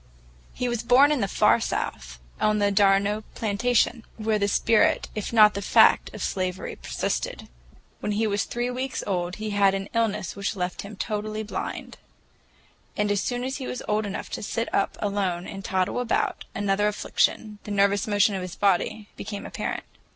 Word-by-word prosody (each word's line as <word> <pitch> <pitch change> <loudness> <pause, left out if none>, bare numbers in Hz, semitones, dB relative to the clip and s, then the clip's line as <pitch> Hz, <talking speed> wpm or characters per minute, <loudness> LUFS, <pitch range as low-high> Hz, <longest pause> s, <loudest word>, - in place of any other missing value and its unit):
He 250 - -3
was 240 -2 -1
born 260 +5 +5
in 290 -5 +1
the 200 - +1
Far - - +4
South, 60 -2 -3 0.2
on 215 0 +2
the 205 -1 +2
d'Arnault 200 +1 +3
plantation, 230 +2 +1
where 215 -1 0
the 200 - +2
spirit 215 +2 +3
if 210 - -4
not 215 -2 +7
the 200 - -3
fact - - +5
of - - -5
slavery 185 -1 -2
persisted. - - -3 0.5
When 210 - -2
he 220 +2 +1
was 205 -1 0
three 240 +1 -2
weeks 255 0 -3
old 180 -2 -2
he 215 0 -4
had 200 -1 +3
an 195 +1 -4
illness 210 -5 0
which 200 0 -2
left 180 -1 -3
him 205 +1 -9
totally 215 +1 -3
blind. 210 - -5 1.0
As 205 -1 +1
soon 245 0 -2
as 265 +2 -3
he 265 - -5
was 250 - -5
old 210 0 0
enough 200 - -5
to - - -4
sit 230 +2 -3
up 200 - 0
alone 195 -4 -1
and 195 0 -7
toddle 190 +5 0
about, 245 -2 -1
another 205 0 +1
affliction, 210 0 0
the - - -7
nervous 200 0 +2
motion 205 0 +3
of 190 - -2
his 180 -1 -6
body, 205 +2 +1
became 205 0 -6
apparent. - - -4
205 Hz, 180 wpm, -25 LUFS, 195-220 Hz, 1.0 s, not